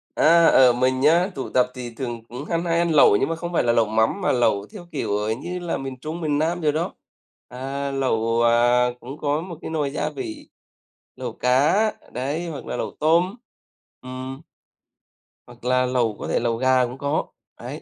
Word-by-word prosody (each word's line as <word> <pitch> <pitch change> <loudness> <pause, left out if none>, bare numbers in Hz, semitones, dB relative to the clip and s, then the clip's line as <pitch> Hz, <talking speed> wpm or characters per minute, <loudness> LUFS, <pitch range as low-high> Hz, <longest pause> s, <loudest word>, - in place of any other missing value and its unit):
A, 170 +1 +5
ở, 125 -2 +6
mình 130 +1 +1
á, 170 +5 +4
tụ 135 - -5
tập 125 -1 +3
thì 125 -2 -6
thường 120 -3 -4
cũng 125 +5 -7
ha 170 - -1
hay 170 0 0
ăn 170 0 +1
lẩu, 145 -9 +6
nhưng 135 - 0
mà 165 - -1
không 175 +1 -6
phải - - +2
là 120 -1 +2
lẩu 115 -1 +3
mắm 110 - +1
mà - - +2
lẩu 105 -5 +1
theo 180 -4 -9
kiểu, 105 - -1
ờ, 105 +1 -1
như 175 +10 -4
là 175 -1 -3
miền 135 -1 -6
Trung, 155 +6 -6
miền 150 -2 0
Nam 170 +3 0
rồi 150 -2 +2
đó. 160 +3 -2 0.5
À, 135 +2 -4
lẩu, 115 -4 0
à, 120 +1 +4
cũng 135 +5 -9
có 150 0 -1
một 170 -2 -8
cái - - -6
nồi 150 -3 -1
gia 150 - -2
vị, 135 -7 -7 0.7
lẩu - - -5
cá, 150 - +2 0.2
đấy, 145 +7 -3
hoặc 150 -4 -7
là - - -4
lẩu - - -3
tôm. 170 +6 +3 0.7
Ừm. 130 +2 -7 1.1
Hoặc 120 -1 -16
là 125 0 +2
lẩu 120 -4 0
có - - -5
thể - - +1
lẩu 115 -1 -1
gà 130 0 +3
cũng 125 +2 -7
có. 140 +3 -1 0.3
Đấy. - - -7
135 Hz, 205 wpm, -23 LUFS, 125-160 Hz, 1.1 s, ở